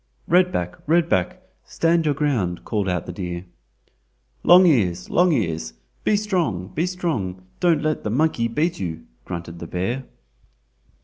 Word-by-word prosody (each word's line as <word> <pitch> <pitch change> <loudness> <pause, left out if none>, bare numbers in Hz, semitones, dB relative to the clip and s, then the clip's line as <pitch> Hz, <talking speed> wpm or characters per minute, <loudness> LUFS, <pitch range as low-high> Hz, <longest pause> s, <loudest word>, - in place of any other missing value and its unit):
"Red 180 +1 +4
back! 90 - -3
Red 170 +1 +3
back! 180 0 0 0.2
stand 165 0 +1
your 145 -2 +2
ground!" 115 - -1
called 105 -4 -1
out 90 -1 -1
the - - -5
deer. 90 -1 -5 1.0
"Long 180 +2 +7
ears! 95 - +2
Long 180 0 +4
ears! 85 - -1 0.3
be 215 - +3
strong, 170 - -1
be 165 +9 -1
strong—don't 150 - -1
let 155 0 -1
the - - -2
monkey 125 -1 +1
beat 155 +9 -1
you!" 80 -4 -5 0.2
grunted 85 -1 -6
the 85 - -7
bear. 115 +10 -2
120 Hz, 145 wpm, -22 LUFS, -, 1.0 s, Long